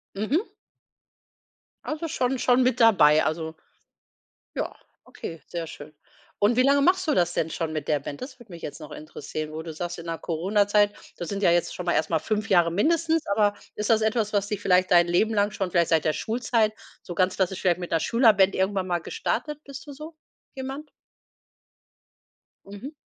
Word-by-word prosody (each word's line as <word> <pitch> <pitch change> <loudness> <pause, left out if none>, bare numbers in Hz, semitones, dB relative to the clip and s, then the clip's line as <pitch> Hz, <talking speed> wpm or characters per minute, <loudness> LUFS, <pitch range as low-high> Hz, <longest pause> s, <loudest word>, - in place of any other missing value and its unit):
Mhm. 265 - 0 1.4
Also 310 +2 -3
schon 260 -2 -1
schon 250 0 +3
mit 255 -1 +1
dabei. 155 -10 +6
Also 160 0 -2 1.0
Ja, - - -3 0.3
okay, 165 -1 -9
sehr 170 -2 -5
schön. 150 +1 -11 0.5
Und 210 +3 +3
wie 255 - +4
lange 280 +1 +4
machst 370 +2 +2
du 300 - +3
das 175 -1 +2
denn 165 - -1
schon 160 -1 -3
mit 150 -2 -4
der 150 -2 +2
Band? 145 - -8
Das 260 0 -8
würde 225 -6 -16
mich 170 - -10
jetzt 150 - -7
noch 150 -1 -10
interessieren. 155 0 -6
Wo 155 - -5
du 165 -2 -7
sagst, 175 +2 -5
in 170 - -9
der 165 -1 -4
Corona-Zeit, 205 +4 +2 0.2
das 175 - -5
sind 200 0 -3
ja 180 - +4
jetzt 175 0 +1
schon 180 - -6
mal - - +2
erst 160 - 0
mal 160 - +2
5 210 +1 -2
Jahre 175 -3 +4
mindestens, 325 - +1
aber 205 0 +2 0.2
ist 210 - -3
das 220 -1 +4
etwas, 220 -1 0
was 200 -1 +1
dich 205 -1 -4
vielleicht 185 -2 +3
dein 175 -1 +6
Leben 215 +6 +2
lang 205 -1 +2
schon, 190 -4 -3
vielleicht 170 -2 +2
seit 160 -2 +2
der 155 - +2
Schulzeit 225 -1 0 0.3
so 175 - -8
ganz 185 0 +2
klassisch 190 -1 -1
vielleicht 180 -1 +2
mit 175 - -5
'ner 165 - +2
Schülerband 215 -5 +4
irgendwann 190 0 0
mal 175 -1 0
gestartet? 300 - -3
Bist 280 +1 -10
du 285 - -8
so 310 +3 -10 0.4
jemand? 270 +3 -6 1.8
Mhm. 205 +9 -8
200 Hz, 195 wpm, -25 LUFS, 170-240 Hz, 1.8 s, dabei